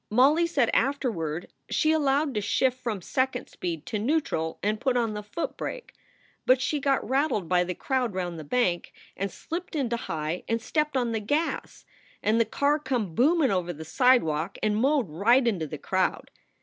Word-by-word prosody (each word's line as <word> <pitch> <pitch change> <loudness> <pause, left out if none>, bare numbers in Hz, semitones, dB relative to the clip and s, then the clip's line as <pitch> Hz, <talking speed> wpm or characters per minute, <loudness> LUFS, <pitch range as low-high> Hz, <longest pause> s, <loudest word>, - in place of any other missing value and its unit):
Molly 285 +9 +4
said 280 -8 +2
afterward 215 - -1 0.2
she 310 - +2
allowed 290 -2 +2
to 210 - -1
shift 255 +5 +1
from 215 -7 -3
second 260 +2 -1
speed 165 -4 -5
to 215 - -3
neutarl 215 - 0
and 210 +2 0
put 260 -2 +1
on 230 -3 0
the 210 - -4
foot 210 +10 -4
brake. - - -6 0.5
But 255 0 +6
she 260 +3 0
got 275 -1 +1
rattled 265 - +1
by 180 0 +3
the 180 0 -4
crowd 250 - -1
round 175 -3 -3
the - - -6
bank, 175 0 0 0.2
and 195 +1 -2
slipped 335 - -6
into 240 -5 0
high 160 -4 -3
and 230 0 0
stepped 300 +5 0
on 240 -2 0
the 225 - 0
gas, 295 +10 -2 0.4
and 220 +2 +3
the - - +3
car 285 +7 +1
come 245 - -2
boomin 290 - +3
over 180 -2 0
the 160 -1 -8
sidewalk 185 - +2
and 210 -1 +2
mowed 265 +1 +2
right 230 - +3
into 180 -9 0
the - - -6
crowd. - - -1
235 Hz, 185 wpm, -27 LUFS, 185-275 Hz, 0.5 s, But